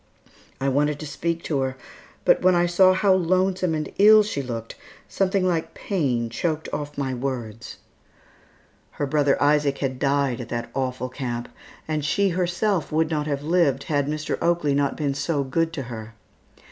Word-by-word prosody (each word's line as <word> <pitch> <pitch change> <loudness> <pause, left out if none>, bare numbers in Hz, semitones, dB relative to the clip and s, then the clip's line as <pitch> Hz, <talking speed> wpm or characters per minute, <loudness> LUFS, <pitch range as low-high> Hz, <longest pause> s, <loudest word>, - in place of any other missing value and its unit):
I 135 - -1
wanted 145 +2 +1
to - - -5
speak 165 +3 -3
to 145 -4 -1
her, 130 0 -2 0.5
but - - +4
when 185 0 +4
I 175 0 +3
saw 185 +2 +5
how 190 +1 +3
lonesome 185 -1 +1
and 155 -1 -4
ill 215 +1 +8
she 205 -9 -3
looked, 115 -3 -6 0.3
something 190 -1 0
like 165 -3 -1
pain 135 - -1
choked 155 +5 -2
off 145 0 -4
my 135 -2 -1
words. 120 -4 -5 1.2
Her 145 - -2
brother 145 0 +2
Isaac 145 -1 +2
had 130 -2 -3
died 140 -3 +1
at 120 - -8
that 120 0 -4
awful 130 -1 -2
camp 120 -2 -4 0.4
and 155 -1 -1
she 195 +7 +2
herself 180 +1 0
would 160 +1 +1
not 150 -1 -1
have 140 -1 -2
lived 155 -5 +2
had 145 -2 0
Mr. 155 +1 -3
Oakley 170 -4 +1
not 140 0 0
been 145 -3 -1
so 140 +1 -1
good 165 +5 0
to 145 -4 -4
her. 115 -2 -8
145 Hz, 170 wpm, -24 LUFS, 135-170 Hz, 1.2 s, ill